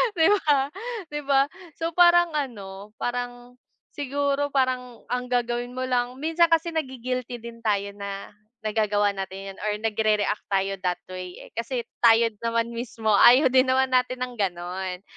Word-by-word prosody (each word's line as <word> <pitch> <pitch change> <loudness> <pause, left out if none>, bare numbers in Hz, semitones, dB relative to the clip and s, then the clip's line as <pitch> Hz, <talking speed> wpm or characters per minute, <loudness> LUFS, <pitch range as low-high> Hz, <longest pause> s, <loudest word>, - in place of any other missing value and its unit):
Di 325 -2 +4
ba 290 -8 +2 0.4
di 295 - -3
ba? 275 -1 +5 0.3
So 330 +1 -2
parang 345 0 +5
ano 210 -8 -5
parang 245 0 -5 0.3
siguro 285 0 -1
parang 255 -3 -1
ang 250 0 -1
gagawin 245 0 -1
mo 255 - -2
lang 250 -1 0
minsan 325 +5 +2
kasi 330 0 +2
nagi-guilty 255 -5 -3
din 235 0 -9
tayo 200 -3 0
na 200 -1 -7 0.3
nagagawa 210 -1 +1
natin 195 0 -6
yun - - -20
or 210 - 0
nagrereact 215 -1 0
tayo 195 0 +1
that 180 -1 0
way, 185 -1 -7
eh. - - -13
Kasi 235 +1 -3 0.2
tayo 230 0 +5
din 210 - -30
naman 230 0 0
mismo 230 -2 -2
ayaw 250 +6 +7
din 260 0 +4
naman 260 0 +2
natin 255 0 +1
ng 250 -1 -6
ganon. 180 0 -3
245 Hz, 160 wpm, -25 LUFS, 210-265 Hz, 0.4 s, ayaw